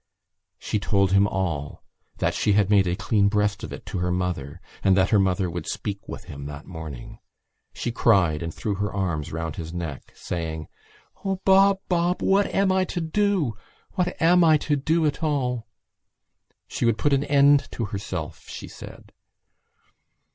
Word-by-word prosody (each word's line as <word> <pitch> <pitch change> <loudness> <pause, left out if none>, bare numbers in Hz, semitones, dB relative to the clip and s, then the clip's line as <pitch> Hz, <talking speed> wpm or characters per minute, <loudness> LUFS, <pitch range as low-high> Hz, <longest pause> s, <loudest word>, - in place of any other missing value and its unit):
She 105 - -2
told 100 -1 +1
him 100 +1 +5
all, 85 -8 -3 0.3
that - - 0
she 105 - +1
had 100 0 +3
made 100 -3 +5
a 90 - 0
clean 100 +1 +2
breast 105 +1 0
of - - -6
it - - -8
to 110 -4 -4
her 90 0 0
mother 90 -4 -2 0.2
and 95 -1 +4
that 95 0 +3
her 105 - +5
mother 95 -1 +1
would 85 -2 -5
speak 100 -1 -4
with - - -7
him 70 0 -8
that 75 +1 -8
morning. 80 -8 -8 0.5
She 120 - -3
cried 90 -9 +3
and 85 0 -3
threw 105 +5 -3
her 100 +1 -2
arms 85 -7 -2
round 80 -1 -4
his 80 -1 -5
neck, 85 -5 -6
saying: 80 -3 -4 0.6
"O 195 -1 0
Bob! 195 0 +5
Bob! 175 0 +1
What 195 +1 +3
am 195 -1 +2
I 190 0 +3
to 180 - -4
do? 175 - +1 0.4
What 180 -2 -2
am 175 +2 +5
I 160 -2 +6
to 150 - +2
do 160 +4 +1
at 150 +2 -1
all?" 125 -7 -1 1.0
She - - -4
would 115 -2 +3
put 145 - +1
an 140 0 +2
end 140 0 +5
to 115 - -2
herself, 100 0 -6
she - - -7
said. - - -12
100 Hz, 175 wpm, -24 LUFS, 90-145 Hz, 1.0 s, I